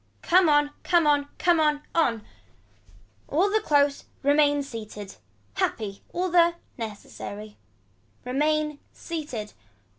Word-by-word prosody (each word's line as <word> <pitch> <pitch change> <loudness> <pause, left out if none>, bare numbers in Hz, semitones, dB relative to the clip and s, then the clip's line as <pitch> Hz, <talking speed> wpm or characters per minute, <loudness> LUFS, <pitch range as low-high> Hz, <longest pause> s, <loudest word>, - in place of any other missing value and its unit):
Come 360 -1 +5
on 295 0 +3
come 345 -3 +3
on 290 -1 +3
come 345 -2 +3
on 300 -1 +2
on. 235 -10 +1 1.0
All 370 +7 +2
the 435 - +3
close. 285 -5 +2 0.2
Remain 290 0 +3
seated. 215 -6 -8 0.4
Happy. 200 - -2
All 365 +1 -1
the. 340 -1 +5 0.2
Necessity. 210 -1 -8 0.7
Remain 300 +3 0
seated. 290 -11 -6
290 Hz, 110 wpm, -26 LUFS, 230-325 Hz, 1.0 s, Come